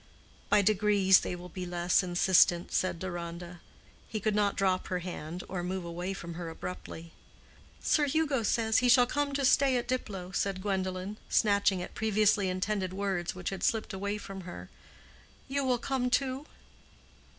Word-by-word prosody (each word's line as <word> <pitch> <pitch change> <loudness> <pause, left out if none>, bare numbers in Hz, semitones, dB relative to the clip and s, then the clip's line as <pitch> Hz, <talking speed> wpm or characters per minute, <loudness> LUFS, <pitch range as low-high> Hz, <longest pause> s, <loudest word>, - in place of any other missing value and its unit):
"By 205 - +5
degrees 200 -2 +4
they - - -4
will 180 0 -9
be 185 +2 -6
less 175 0 +2
insistent," 175 -1 +3
said 185 -2 0
Deronda. 175 0 -6 0.5
He 215 - -3
could 215 +1 0
not 205 -1 +1
drop 190 -2 +1
her 180 - -1
hand 175 -1 -6
or 180 -1 -4
move 180 0 -3
away 175 +2 -4
from 170 -2 -7
her 170 0 -6
abruptly. 165 0 -8 0.7
"Sir 295 -2 +3
Hugo 290 -3 +1
says 220 0 +2
he 250 - +2
shall 245 0 +7
come 290 +3 -1
to 275 -1 0
stay 270 0 +4
at 240 - -3
Diplow," 195 -8 -3
said 195 +1 -1
Gwendolen, 190 0 -3
snatching 200 -3 +3
at - - -9
previously 210 -2 +2
intended 185 0 -2
words 190 -3 -2
which 180 +1 -4
had 195 - -5
slipped 225 -6 0
away 200 +2 -2
from 195 -2 -8
her. 175 -1 -9 0.8
"You 275 +1 -1
will 255 -2 +2
come 250 +1 -1
too." 265 +3 0
195 Hz, 165 wpm, -30 LUFS, 180-220 Hz, 0.8 s, shall